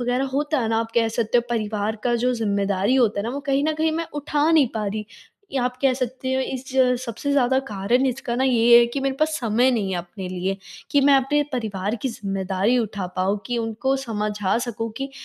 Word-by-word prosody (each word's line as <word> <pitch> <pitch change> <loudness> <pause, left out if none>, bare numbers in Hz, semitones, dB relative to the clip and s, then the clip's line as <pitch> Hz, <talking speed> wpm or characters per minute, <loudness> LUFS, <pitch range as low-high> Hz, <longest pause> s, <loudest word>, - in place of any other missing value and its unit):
वग़ैरह 245 +2 0
होता 295 +2 0
है 230 -3 0
ना, 225 - +1
आप 225 0 -2
कह 230 -1 +3
सकते 230 +1 +1
हो - - +1
परिवार 215 -1 -1
का 240 -1 +2
जो 250 +2 +1
ज़िम्मेदारी 200 -1 0
होता 225 -6 +2
है - - -3
ना, 235 - -2
वो 280 +3 -4
कहीं 275 +1 +2
न 315 - +1
कहीं 315 +1 +1
मैं 330 0 -2
उठा 295 +1 +1
नहीं 315 -4 +5
पा 215 - -2
रही। 210 +1 -3 0.5
ये 275 - 0
आप 250 0 -1
कह 270 -2 +4
सकते 260 +1 -3
हो 265 - +1
इस 260 0 -4
ज 255 -1 +4
सबसे 235 +4 -4
ज़्यादा 265 -2 +3
कारण 210 +6 +1
इसका 250 -1 -2
ना 260 - +1
ये 235 -2 +6
है 240 - +6
कि 240 +4 -4
मेरे 270 0 0
पास 310 - +4
समय 240 +2 +2
नहीं 215 -6 -1
है - - -1
अपने 180 +2 -7
लिए, 185 +1 -2 0.3
कि 285 - +4
मैं 280 0 +5
अपने 290 +2 +2
परिवार 215 -3 -2
की 265 - 0
ज़िम्मेदारी 195 +1 -1
उठा 205 -5 -2
पाऊँ 195 +3 +1
कि 245 -1 -1
उनको 225 +4 -1
समझा 210 -6 -1
सकूँ 230 -2 -4
कि 270 +2 -4
240 Hz, 230 wpm, -23 LUFS, 210-265 Hz, 0.5 s, ये